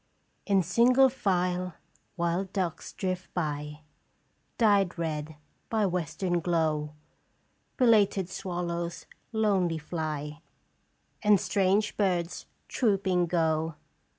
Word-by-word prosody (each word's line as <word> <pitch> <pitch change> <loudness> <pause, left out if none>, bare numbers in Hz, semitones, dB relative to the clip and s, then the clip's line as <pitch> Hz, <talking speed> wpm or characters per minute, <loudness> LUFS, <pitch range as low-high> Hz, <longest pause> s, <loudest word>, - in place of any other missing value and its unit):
" - - -44
In 195 -2 +3
single 245 +9 +5
file 180 -6 -1 0.4
wild 175 +2 -1
ducks 180 -5 -2
drift 185 -1 -4
by. 150 -2 -3 0.8
Dyed 200 -5 +3
red 155 -2 -3 0.3
by 220 -2 +1
western 175 0 -1
glow. 155 -3 0 0.8
Belated 205 -6 +4
swallows 175 -2 -4 0.3
lonely 195 -7 +1
fly, 155 -1 -4 0.8
And 210 -2 +5
strange 200 +3 +1
birds 180 -4 -1 0.2
trooping 190 -6 +1
go. 160 -2 0
180 Hz, 95 wpm, -28 LUFS, 165-195 Hz, 0.8 s, single